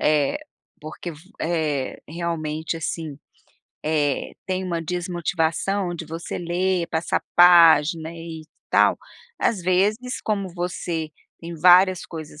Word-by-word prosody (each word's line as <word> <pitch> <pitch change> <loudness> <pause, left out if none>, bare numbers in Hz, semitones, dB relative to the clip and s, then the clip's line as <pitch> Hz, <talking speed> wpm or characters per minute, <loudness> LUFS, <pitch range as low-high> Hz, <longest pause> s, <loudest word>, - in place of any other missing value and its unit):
eh 150 - +2 0.4
,porque 155 +3 -7
v 155 - -11 0.2
eh, 155 -5 -1
realmente 160 -1 -3
assim, 160 -2 -4 0.7
eh, 150 -3 0
tem 185 0 -2
uma 170 -2 -2
desmotivação 175 +2 -1
de 170 - -6
você 165 +2 -6
ler, 175 0 -1
passar 160 0 -1
página 165 -2 +6
e 165 -1 -8 0.3
tal, - - +4 0.4
às 205 -6 0
vezes, 205 +8 +1
como 200 -3 -2
você 175 -2 -3 0.3
tem 170 0 -7
várias 180 +2 +5
coisas 155 -2 -9
170 Hz, 115 wpm, -23 LUFS, 160-180 Hz, 0.7 s, página